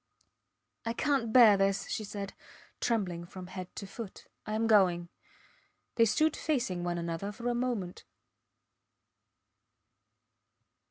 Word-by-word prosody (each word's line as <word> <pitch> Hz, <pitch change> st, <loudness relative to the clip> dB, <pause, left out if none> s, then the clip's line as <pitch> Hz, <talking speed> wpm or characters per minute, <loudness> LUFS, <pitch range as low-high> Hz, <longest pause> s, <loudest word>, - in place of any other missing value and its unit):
I 230 Hz, -, -2 dB
cant 270 Hz, -4 st, 0 dB
bear 225 Hz, -4 st, +8 dB
this, 195 Hz, 0 st, +1 dB
she 215 Hz, -, -3 dB
said, 200 Hz, -1 st, -6 dB, 0.5 s
trembling 185 Hz, -7 st, -1 dB
from 180 Hz, +1 st, -9 dB
head 185 Hz, 0 st, -7 dB
to 200 Hz, -, -6 dB
foot. 200 Hz, 0 st, -9 dB, 0.2 s
I 215 Hz, -, -2 dB
am 225 Hz, +1 st, +1 dB
going. 180 Hz, -6 st, +4 dB, 0.8 s
They 230 Hz, -, +5 dB
stood 310 Hz, +8 st, +2 dB
facing 240 Hz, -, -1 dB
one 175 Hz, 0 st, -1 dB
another 170 Hz, +4 st, -3 dB
for 235 Hz, +3 st, -6 dB
a -, -, +1 dB
moment. 240 Hz, -7 st, -2 dB
205 Hz, 120 wpm, -31 LUFS, 180-235 Hz, 0.8 s, bear